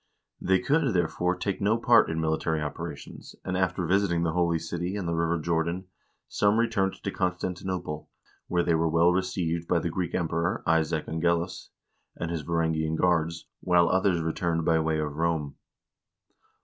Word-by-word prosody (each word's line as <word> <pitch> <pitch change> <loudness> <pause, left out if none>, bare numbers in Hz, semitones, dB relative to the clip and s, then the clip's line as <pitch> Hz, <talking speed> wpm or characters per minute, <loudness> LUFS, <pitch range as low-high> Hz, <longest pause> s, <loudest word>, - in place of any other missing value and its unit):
They 95 0 +3
could, 135 - +1
there 85 -2 +3
fore, 90 +2 -1
take 95 +1 -3
no 105 +3 +3
part 115 0 +5
in 80 0 -2
military 80 0 0
operations, 75 -1 -7
and 90 - -2
after 90 -1 0
visiting 90 -1 +2
the 85 - +1
Holy 85 0 +1
City 85 +3 -4
and 100 -4 -3
the 85 - -1
river 85 +1 +1
Jordan, 85 +3 -1 0.4
some 105 +1 +2
returned 115 -5 +1
to 100 - -2
Constantinople, 90 -3 -3 0.4
where 85 -1 +1
they 85 - +2
were 80 0 +2
well 85 +2 +4
received 90 -2 -1
by 90 - +2
the 85 0 -1
Greek 85 -1 -2
Emperor, 85 0 -1
Isaac 80 -1 +1
Angelus, 85 +1 -1 0.5
and 85 0 -4
his 85 -2 -2
Varangian 80 0 0
guards, 85 -1 +1
while 90 -1 +3
others 95 -2 +2
returned 80 0 -1
by 80 -1 +3
way 80 0 0
of 75 -1 -3
Rome. 80 -4 -1
85 Hz, 165 wpm, -27 LUFS, 80-90 Hz, 0.5 s, part